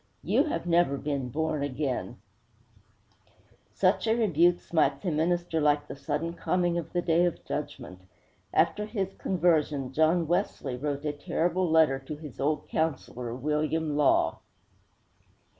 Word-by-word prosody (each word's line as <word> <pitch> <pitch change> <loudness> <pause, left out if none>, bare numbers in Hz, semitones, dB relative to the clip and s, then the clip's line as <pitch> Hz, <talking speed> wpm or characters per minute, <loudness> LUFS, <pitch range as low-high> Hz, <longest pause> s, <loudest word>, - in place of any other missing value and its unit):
You 230 - +2
have 300 - -3
never 170 -5 +3
been 135 -2 -3
born 155 +2 -1
again!' 130 -3 -3 1.5
Such - - +1
a 220 - +3
rebuke 175 -6 +3
smites 145 -3 0
a 180 - +1
minister 165 +1 0
like 145 0 +2
the - - -7
sudden 160 +4 -3
coming 175 0 0
of 165 -1 -8
the 175 -1 -1
Day 165 +1 +3
of 175 - -3
Judgment. 140 -10 -5 0.5
After 210 0 +1
his 195 -4 -3
conversion 155 -7 0
John 160 +2 +3
Wesley 145 -5 -1
wrote 145 +2 -3
a 150 - -1
terrible 170 +4 -1
letter 160 -4 +4
to 135 +3 -7
his 150 -3 -11
old 150 +2 -1
counselor, 130 -6 -2
William 150 +3 -1
Law. 145 -2 +3
155 Hz, 140 wpm, -28 LUFS, 145-175 Hz, 1.5 s, letter